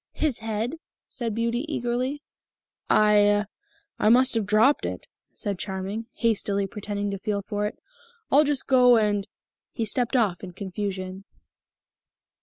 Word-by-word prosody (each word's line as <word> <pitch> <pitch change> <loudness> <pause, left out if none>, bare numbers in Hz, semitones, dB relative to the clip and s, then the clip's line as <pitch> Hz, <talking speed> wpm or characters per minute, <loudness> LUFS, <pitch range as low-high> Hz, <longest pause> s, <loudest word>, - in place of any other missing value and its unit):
"His 300 -6 -1
head?" 225 +7 -3 0.3
said 235 -5 -4
Beauty 235 +2 0
eagerly. 255 +3 -2 0.7
"I 205 0 +4 0.5
I 215 - +4
must 255 +3 +5
have 225 -3 0
dropped 220 +7 +4
it," - - -4 0.3
said 200 -4 -3
Charming, 195 +3 -4
hastily 205 -3 0
pretending 205 0 -4
to 195 - -4
feel 200 0 -2
for 205 +1 -2
it. - - -8 0.5
"I'll 290 +3 +6
just 290 -2 -1
go 250 -2 +6
and 205 -2 +1 0.2
" - - -68
He 230 - -2
stepped 245 +4 0
off 205 -8 +1
in 180 -2 -7
confusion. 190 0 -5
215 Hz, 140 wpm, -25 LUFS, 200-240 Hz, 0.7 s, I'll